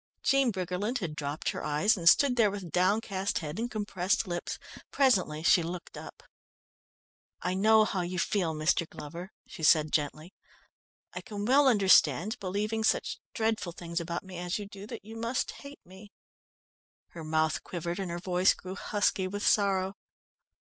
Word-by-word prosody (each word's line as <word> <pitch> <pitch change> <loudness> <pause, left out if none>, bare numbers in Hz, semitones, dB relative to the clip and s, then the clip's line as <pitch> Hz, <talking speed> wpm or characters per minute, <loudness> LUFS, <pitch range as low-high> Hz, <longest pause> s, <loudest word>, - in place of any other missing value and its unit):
Jean 275 -2 +3
Briggerland 190 +5 -2
had 170 -9 -4
dropped 145 +1 -3
her - - -6
eyes, 170 +11 +2
and 170 -4 +5
stood 270 +4 +4
there 225 -4 +4
with 195 -4 -7
downcast 195 +1 0
head 155 +3 -5
and 240 +1 -2
compressed 205 -1 -1
lips. 175 -1 -4 0.3
Presently 185 - +2
she 175 - +5
looked 170 +1 -6
up. - - -10 1.2
"I - - 0
know 215 +3 +5
how 190 -3 -2
you 180 +1 -4
feel, 170 -2 0
Mr. 155 +2 +1
Glover," 170 +6 -8
she - - -11
said 155 -1 +4
gently. 155 +4 -2 0.8
"I - - -5
can 210 -4 -6
well 275 +4 +5
understand, 195 - +4
believing 210 +4 -2
such - - 0 0.2
dreadful 220 -6 -1
things 170 0 -4
about 170 0 -4
me 185 -2 -9
as 180 +1 -2
you 205 - -6
do, 200 0 -10
that 230 -3 -8
you 220 +1 -10
must 230 +3 -2
hate 280 0 -12
me." 190 +3 -14 1.0
Her 165 - -9
mouth 155 0 0
quivered 175 +1 -4
and 190 -2 -3
her 170 - -3
voice 180 +1 +2
grew 185 0 -8
husky 200 -1 0
with 205 +2 -4
sorrow. 195 -2 +2
190 Hz, 165 wpm, -29 LUFS, 170-215 Hz, 1.2 s, and